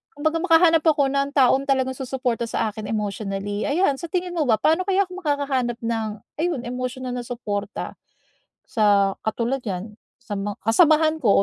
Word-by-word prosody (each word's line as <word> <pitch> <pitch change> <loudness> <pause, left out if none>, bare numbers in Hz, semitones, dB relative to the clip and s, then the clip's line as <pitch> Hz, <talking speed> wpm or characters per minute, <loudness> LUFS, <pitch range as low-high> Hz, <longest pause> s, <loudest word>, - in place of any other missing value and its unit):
kumbaga 315 +2 0
makahanap 330 -1 +5
ako 285 -4 +3
ng 275 0 0
taong 270 +1 +4
talagang 260 -1 +1
susuporta 250 -3 -2
sa 220 -1 -1
akin 210 -1 -7
emotionally. 205 -1 -3
Ayan 285 -2 +1
sa 340 - -5
tingin 360 0 -2
mo 315 -5 0
ba, 225 - +5
paano 325 - +1
kaya 390 +1 +3
ako 365 0 -9
makakahanap 275 -5 0
ng 225 -1 -1 0.3
ayon, 320 -7 -1
emosyonal 255 +1 -4
na 250 - -3
supporta 210 -4 -4 0.7
sa 200 -3 +3
katulad 235 +4 0
yan, 200 +2 -4 0.3
sa 210 -4 -5
ma 205 +1 -3
kasamahan 310 +5 +4
ko 200 -4 +4
255 Hz, 165 wpm, -23 LUFS, 220-310 Hz, 0.7 s, makahanap